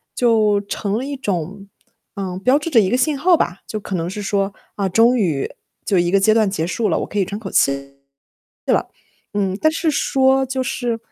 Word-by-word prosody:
就 215 -4 +3
成 200 0 -3
了 250 - -3
一 285 0 -4
种 195 -3 -4 0.5
呃， 185 -2 -4
标 260 +3 +4
志 315 - -4
着 235 - +6
一 190 - +1
个 245 - +2
信 280 +3 +1
号 350 +4 +5
吧。 180 +3 -1
就 215 - -4
可 190 - -4
能 170 0 -2
是 205 +2 -5
说， 195 0 -1 0.2
啊， 200 -2 -1
终 230 +6 +4
于， 160 -10 0 0.3
就 190 -4 +2
一 175 0 +1
个 195 - +4
阶 215 +3 +4
段 215 -3 +3
结 165 -4 -2
束 215 +6 -1
了， - - +1
我 - - -2
可 205 - -3
以 195 - +2
喘 200 +3 -5
口 200 -4 -7
气 140 0 +1 0.7
了。 - - +2 0.5
嗯， 195 -2 -1
但 315 - +5
是 320 -1 0
说 265 -1 +2
就 260 0 -2
是， 240 -2 -2
205 Hz, 230 characters per minute, -20 LUFS, 190-250 Hz, 0.7 s, 着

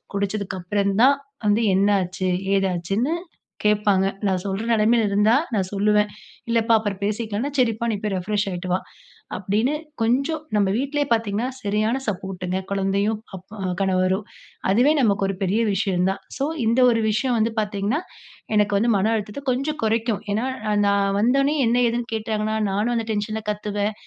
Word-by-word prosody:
குடிச்சதுக்கப்புறம் 200 0 -1
தான் 275 +1 +6 0.3
வந்து, 210 +3 +3
என்ன 200 +2 +3
ஆச்சு? 185 +1 -3 0.3
ஏதாச்சுனு 195 - 0 0.5
கேட்பாங்க. 205 -2 +3 0.2
நான் 185 -1 0
சொல்ற 195 +2 -2
நெலமைல 225 +1 +3
இருந்தா 210 +3 +3 0.2
நான் 190 -3 0
சொல்லுவன். 210 +1 +2 0.4
இல்லப்பா 230 0 +2
அப்புறம் 205 -2 -4
பேசிக்கலாம்னா, 215 +4 -2
சரிப்பா 230 -2 +1
நீ 215 - -1
போய் 210 - -1
ரிப்ரெஷ் 205 +3 -1
ஆகீட்டு 180 0 -5
வா, 185 - +2 0.6
அப்டின்னு 215 +9 0 0.3
கொஞ்சம் 275 +7 +1
நம் 200 -2 +3
வீட்லையே 285 +2 0
பாத்திங்கன்னா 225 +1 0
சரியான 215 +5 0
சப்போர்டுங்க 185 -2 -3
குழந்தையும், 200 +2 0 0.2
அப் 185 0 -11 0.4
கணவரும். 190 +1 +1 0.5
அதுவே 245 +8 +4
நமக்கு 200 -4 +2
ஒரு 195 - -2
பெரிய 200 +5 +1
விஷயம் 190 -2 +1
தான். 195 - -2 0.2
ஸோ 275 - 0 0.2
இந்த 230 +3 +2
ஒரு 230 - +1
விஷயம் 240 +2 +1
வந்து 225 +1 +1
பாத்தீங்கன்னா 205 +6 -1 0.6
எனக்கு 210 -1 +3
வந்து 235 +3 +2
மன 210 +4 +1
அழுத்தத்த 210 +5 -4
கொஞ்சம் 295 +4 -2
குறைக்கும். 225 0 0
ஏன்னா 225 +5 0 0.4
நான் 200 0 +2
வந்தொன்னே 275 +7 +3
என்ன? 240 +2 +2
ஏதுன்னு 235 +1 -2
கேட்டாங்கன்னா, 215 0 -2 0.2
நானும் 215 +5 0
அந்த 225 -1 -1
டென்ஷன்ல 215 +1 -2
கத்துவேன், 210 0 -2
210 Hz, 150 wpm, -23 LUFS, 195-230 Hz, 0.6 s, தான்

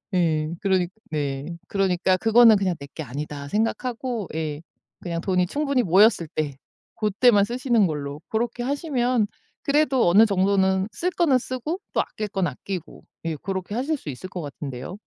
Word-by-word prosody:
예. 155 -3 +1
그러니까 185 -3 +1 0.2
네. 145 +2 -3
그러니까 185 -1 +2
그거는 225 0 +6
그냥 185 -3 0
'내 140 - -8
게 160 - -5
아니다.' 140 +2 -6
생각하고 230 - -2
예. 155 -1 -3 0.4
그냥 170 -2 -3
돈이 180 -2 +1
충분히 280 -2 0
모였을 190 -1 +4
때 145 -3 -3 0.4
고때만 210 0 +4
쓰시는 240 -3 +2
걸로 145 -2 -5
고렇게 240 +2 -1
하시면 255 -5 0 0.4
그래도 280 -5 +3
어느 210 +6 +7
정도는 190 -1 +2
쓸 360 - -1
거는 320 -8 +3
쓰고 255 +7 -4
또 - - +3
아낄 215 -1 -5
건 195 -3 -1
아끼고 175 +6 -6 0.2
예 160 -1 -1
고렇게 190 +4 -4
하실 290 +5 0
수 160 - -8
있을 145 +8 -7
것 180 -2 -5
같은데요. 140 +4 -7
195 Hz, 335 characters per minute, -24 LUFS, 165-240 Hz, 0.4 s, 어느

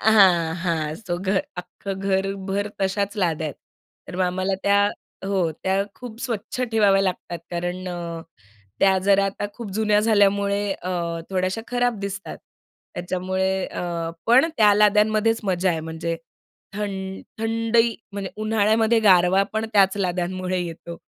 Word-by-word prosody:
हां, 185 -7 +5
हां. 165 -3 -1
सो 185 -5 -4
घर, 190 +9 0
अख्खं 190 +2 -6
घरभर 195 +1 -1
तशाच 200 +2 -1
लाद्या 165 -5 0
आहेत. 145 - -5 0.5
तर - - -7
मग 185 - +1
आम्हाला 185 +2 0
त्या 200 0 +4 0.5
हो, 190 -4 +1
त्या 190 +1 +2
खूप 240 -3 -10
स्वच्छ 235 0 -4
ठेवाव्या 200 -3 +4
लागतात. 180 -2 -3
कारण 175 +1 -3
अ, 170 -2 -5 0.6
त्या 190 -1 +5
जरा 195 +1 +3
आता 195 +1 -2
खूप 230 -4 -7
जुन्या 210 0 +2
झाल्यामुळे 200 -2 +3
अ, 185 -1 -6 0.4
थोड्याशा 185 +3 -1
खराब 245 -2 0
दिसतात. 200 0 -5 0.6
त्याच्यामुळे 185 +1 -1
अ, 170 -2 -3 0.2
पण 255 +7 +6
त्या 210 -2 +6
लाद्यांमध्येच 215 +2 +3
मजा 185 -1 +1
आहे; 165 -2 -1
म्हणजे 160 +1 -4 0.6
थंड 195 -2 -4 0.2
थंडही 230 +1 +2 0.2
म्हणजे 200 -1 -4
उन्हाळ्यामध्ये 220 +1 +3
गारवा 190 -2 +5
पण 220 0 -1
त्याच 195 -1 +4
लाद्यांमुळे 185 0 -1
येतो. 170 0 -6
195 Hz, 135 wpm, -23 LUFS, 180-210 Hz, 0.6 s, पण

